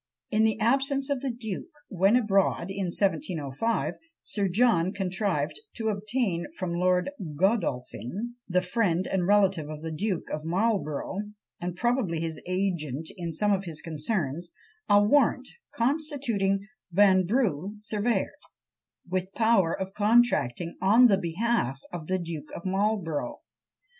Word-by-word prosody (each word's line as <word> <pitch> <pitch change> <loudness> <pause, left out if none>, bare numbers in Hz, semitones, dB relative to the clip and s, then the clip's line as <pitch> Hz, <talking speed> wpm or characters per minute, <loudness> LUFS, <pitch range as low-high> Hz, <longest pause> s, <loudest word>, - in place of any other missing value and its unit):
In 220 +1 +4
the 220 0 +1
absence 270 +4 +1
of 275 -3 0
the 275 - -1
duke, 235 - -5 0.2
when 195 +4 +3
abroad 195 -5 +2
in 195 0 -2
1705, 185 - -1 0.3
Sir 200 -2 -1
John 190 -3 +3
contrived 190 - -1 0.2
to 220 -2 -1
obtain 210 -3 -1
from 185 -3 -2
Lord 180 +6 +2 0.2
Godolphin, 190 - -1 0.2
the 180 0 +2
friend 185 -2 +1
and 180 -2 0
relative 195 -6 +3
of 155 0 -7
the 160 - -4
Duke 185 +2 -2
of 150 - -3
Marlborough, 190 -1 -1 0.4
and 175 0 -4
probably 235 -6 0
his 160 -1 -4
agent 170 -6 -2
in 170 -2 -4
some 205 +6 +1
of 195 0 -1
his 160 -3 -5
concerns, 165 0 -3 0.4
a 205 - +7
warrant, 285 +8 +3 0.2
constituting 235 -8 0 0.2
Vanbrugh 195 - +3
surveyor, 215 +2 0 0.8
with 185 +1 -2
power 220 -7 +3
of 190 0 -4
contracting 205 - +2
on 215 +6 +6
the 205 -5 +5
behalf 175 - 0
of 165 -3 -6
the 185 - +1
Duke 165 -4 -6
of 170 - -8
Marlborough. 190 -5 -1
195 Hz, 135 wpm, -27 LUFS, 170-220 Hz, 0.8 s, a